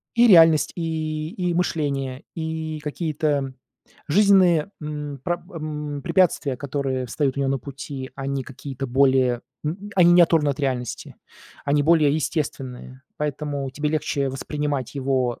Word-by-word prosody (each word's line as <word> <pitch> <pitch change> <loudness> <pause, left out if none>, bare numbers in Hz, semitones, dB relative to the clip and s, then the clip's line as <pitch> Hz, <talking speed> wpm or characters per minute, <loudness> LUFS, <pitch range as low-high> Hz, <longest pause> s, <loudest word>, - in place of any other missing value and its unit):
И 235 0 +6
реальность, 165 -4 +6
и 155 -2 -3
и 180 -4 -1
мышление, 140 -6 -1
и 160 -1 -3
какие-то 150 -3 -1 0.6
жизненные, 190 -1 +4
м, 150 -2 -5
пра 175 0 -1
м, 150 -3 -5
препятствия, 150 -6 +2
которые 135 -2 -2
встают 135 +2 -1
у 140 - -1
него 135 - +1
на 135 - 0
пути, 135 0 -7
они 135 0 -3
какие-то 135 0 -6
более 130 -1 +3 0.2
м, 190 +7 -4
они 175 -1 +7
не 175 - +8
оторваны 160 -3 +3
от 140 - -4
реальности, 130 -3 -3 0.5
они 145 0 +2
более 155 -2 +4
естественные, 130 -4 -4
поэтому 145 -2 -3
тебе 150 +3 -2
легче 145 -2 -1
воспринимать 145 0 -3
его 130 -3 0
145 Hz, 135 wpm, -23 LUFS, 135-160 Hz, 0.6 s, не